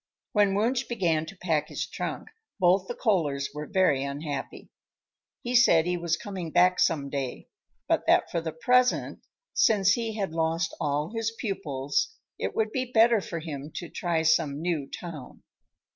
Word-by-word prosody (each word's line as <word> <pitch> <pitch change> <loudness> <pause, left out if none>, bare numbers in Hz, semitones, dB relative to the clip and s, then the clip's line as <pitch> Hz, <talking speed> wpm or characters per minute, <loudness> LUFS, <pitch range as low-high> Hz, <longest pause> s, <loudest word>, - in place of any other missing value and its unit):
When 205 -2 +3
Wunsch 240 +5 +1
began 170 -9 0
to 195 - -10
pack 160 -5 0
his - - -3
trunk, - - -5 0.3
both 185 +1 +3
the 240 - -4
Kohlers 150 - 0
were 150 0 -6
very 185 -9 +2
unhappy. 140 0 -5 0.7
He 245 - -3
said 170 -10 +5
he 180 0 0
was 170 -1 -1
coming 185 -4 -6
back 180 +2 +4
some 150 -5 +2
day, 135 -3 -4 0.4
but - - +1
that - - +4
for 170 - -1
the 160 -1 -4
present, 250 +10 +2 0.3
since 200 -3 +4
he 225 0 -1
had 195 -5 -2
lost 165 0 0
all 150 +4 -1
his 225 -1 -1
pupils, 170 - -2 0.2
it - - -3
would 220 -1 0
be 255 +1 -1
better 225 -2 +5
for 170 - -5
him 150 -3 -6
to 175 - -5
try 170 -2 -1
some 155 -3 +2
"new 160 -4 -2
town." 160 -7 -9
175 Hz, 165 wpm, -27 LUFS, 155-210 Hz, 0.7 s, said